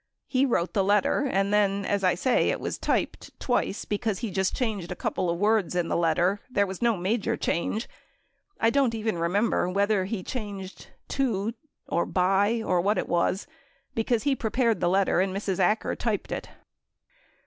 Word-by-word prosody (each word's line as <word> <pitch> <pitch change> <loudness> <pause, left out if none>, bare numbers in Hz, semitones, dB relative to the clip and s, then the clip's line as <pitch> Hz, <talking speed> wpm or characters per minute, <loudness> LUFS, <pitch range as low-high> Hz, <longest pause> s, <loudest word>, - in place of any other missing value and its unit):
He 265 +1 +2
Avrote 180 -8 0
the 195 - +2
letter 205 +8 +2
and 195 +1 +1
then, 200 -1 +2
as 200 -1 0
I 180 -1 +3
say, 250 +8 +2
it - - -1
was - - -4
typed - - -2
twice 245 -5 -1
because 210 -1 -1
he 225 0 -4
just 190 0 0
changed 210 -8 -2
a - - -3
couple 180 - -2
of 170 - 0
words 205 -2 +2
in 175 -2 0
the - - 0
letter. 170 +4 +2
There 200 -5 +2
was 190 -2 -7
no 235 -3 +2
major 200 +5 0
change. 210 +6 -1 0.7
I 225 - +3
don't 270 -4 +2
even 220 -5 -2
remember 180 +2 +1
whether 200 +1 +1
he 195 -1 -4
changed 200 -5 -6 0.2
"to" 230 -5 0 0.3
or - - +1
a - - -2
"by" 195 +5 +2
or 180 -1 +2
what 205 +4 +1
it - - -1
was, 175 +3 0 0.5
because 225 0 0
he 280 -1 +2
prepared 230 -1 +1
the 175 - +2
letter 190 0 +2
and 190 0 -1
Mrs. 195 -2 -2
Acker 210 +4 +1
typed - - -2
it. - - -4
200 Hz, 185 wpm, -26 LUFS, 185-225 Hz, 0.7 s, I